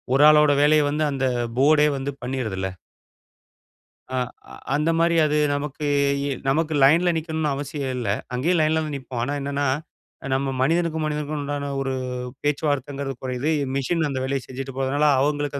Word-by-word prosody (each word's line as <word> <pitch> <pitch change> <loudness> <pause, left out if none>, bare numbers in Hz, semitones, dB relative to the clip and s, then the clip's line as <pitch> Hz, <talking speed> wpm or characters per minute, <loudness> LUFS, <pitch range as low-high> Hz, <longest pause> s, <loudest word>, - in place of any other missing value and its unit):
ஒரு 140 - +5
ஆளோட 150 -1 +6
வேலைய 150 +1 +5
வந்து, 150 +2 0
அந்த 135 -1 -1 0.3
போர்டே 150 +2 +5
வந்து 135 +1 -3
பண்ணிருதுல்ல. 115 -7 -2 1.5
ஆ - - 0 0.6
அந்த 150 +3 +1
மாரி 170 0 +3
அது 150 0 +1 0.2
நமக்கு 145 +1 -4 0.4
இ - - -1 0.2
நமக்கு 155 +3 +1
லைன்ல 165 +6 +5
நிக்கணும்னு 160 -2 -1
அவசியம் 140 -1 -4
இல்ல. 120 -5 -2 0.2
அங்கேயும் 165 +8 +1
லைன்ல 160 +1 +2
தான் 150 -2 -4
நிப்போம். 130 -2 -5
ஆனா 140 +4 -2
என்னன்னா, 140 +1 -1 0.7
நம்ம 135 0 -1
மனிதனுக்கும், 160 +2 +1
மனிதனுக்கும் 150 0 -3
உண்டான 140 0 -3
ஒரு 135 -1 -2 0.5
பேச்சுவார்த்தைங்கிறது 140 -2 -1
கொறையுது. 130 +4 -1 0.2
மெஷின் 155 +4 0
அந்த 130 -2 -3
வேலைய 135 0 -1
செஞ்சுட்டு 135 0 -7
போறதுனால, 140 +3 +1
அவங்களுக்கு 145 0 -1
145 Hz, 145 wpm, -23 LUFS, 135-155 Hz, 1.5 s, ஆளோட